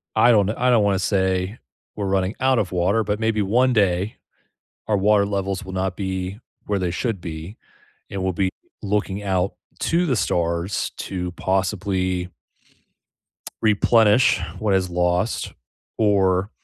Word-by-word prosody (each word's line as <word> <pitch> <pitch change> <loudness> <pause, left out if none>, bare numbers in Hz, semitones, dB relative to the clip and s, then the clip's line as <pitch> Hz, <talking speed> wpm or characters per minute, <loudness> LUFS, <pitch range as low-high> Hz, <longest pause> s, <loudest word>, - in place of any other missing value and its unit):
I 110 +2 +5
don't 105 -4 +4
kn 110 - -2
I 125 - +3
don't 115 -4 +4
wanna 100 -2 +2
say 95 +2 0 0.4
we're 100 - -2
running 95 +1 0
out 130 -1 +3
of 95 -4 -1
water, 95 +5 +2
but 105 0 -1
maybe 110 -1 +1
one 125 +6 +3
day, 100 -2 +1 0.7
our 105 - +3
water 100 +1 +3
levels 100 0 -2
will 95 - -8
not 95 -1 -2
be 95 +1 -4 0.3
where 100 -1 0
they 90 -2 -1
should 105 +2 -2
be, 85 +4 -7 0.5
and 100 -1 -4
we'll 95 0 0
be 95 +1 0 0.3
looking 100 -1 -1
out 95 -1 0 0.3
to 175 +2 +1
the 130 -6 +1
stars 85 0 -1
to 90 -2 -4
possibly 95 -1 -1 1.3
replenish 110 +2 +4 0.2
what 105 -2 +1
is 95 -1 +1
lost, 90 +4 0 0.4
or 100 -2 +2
100 Hz, 150 wpm, -22 LUFS, 95-105 Hz, 1.3 s, I